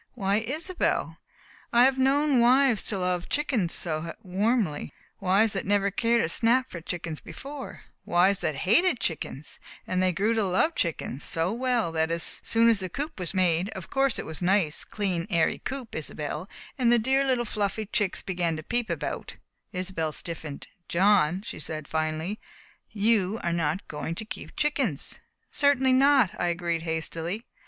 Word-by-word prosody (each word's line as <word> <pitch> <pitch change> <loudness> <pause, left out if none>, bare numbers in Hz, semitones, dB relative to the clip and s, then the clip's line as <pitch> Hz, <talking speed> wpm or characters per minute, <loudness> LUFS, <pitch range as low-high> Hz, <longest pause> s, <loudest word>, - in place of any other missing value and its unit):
"Why, 200 -2 +1
Isobel, 310 - -1 0.5
I 240 +1 +6
have 265 0 +4
known 275 0 +3
wives 250 -1 +5
to 205 - -1
love 180 -1 -1
chickens 250 - 0
so 165 0 -2
warmly 195 -3 0 0.3
wives 200 +3 +3
that 195 - 0
had - - -7
never 200 0 +2
cared 230 +3 +2
a - - +1
snap 245 +7 +2
for 170 - -6
chickens 165 -2 -5
before 275 -1 -9 0.2
wives 185 +3 +3
that 150 - -1
hated 275 - +4
chickens 150 -3 -3 0.3
and 185 0 0
they 185 0 +3
grew 205 +6 +1
to 225 -2 +1
love 190 - +2
chickens 155 - -2
so 165 +4 0
well 240 -6 0
that 160 0 0
as 165 -1 +2
soon 230 0 +4
as 225 -3 +4
the 185 -1 -3
coop 290 - -5
was 180 +1 -3
made 180 0 +2
of 185 -3 -8
course 270 -2 +2
it - - -4
was 160 +1 -6
a - - -1
nice, 180 -5 +2
clean, 190 -5 -2
airy 170 -4 +2
coop, 260 -3 -6
Isobel 155 +3 -4 0.3
and 240 -2 +4
the 240 - +6
dear 265 +4 +2
little 255 -3 +1
fluffy 210 0 -2
chicks 205 -2 -1
began 175 -4 -1
to 155 - -7
peep 240 +5 -1
about - - -4 0.2
" - - -50
Isobel 180 -4 -2
stiffened. 160 -4 -6 0.2
"John," 185 -1 +3
she 230 - -7
said 155 -1 -5
finally 160 +5 -2 0.5
"you 215 -1 +1
are 170 - 0
not 165 +2 -1
going 155 +2 -4
to 220 - -5
keep - - -8
chickens!" 275 - 0 0.3
"Certainly 265 -2 +3
not!" 265 -6 +5
I 175 - +1
agreed 170 -1 -1
hastily. 165 +6 -3
195 Hz, 175 wpm, -27 LUFS, 170-240 Hz, 0.5 s, I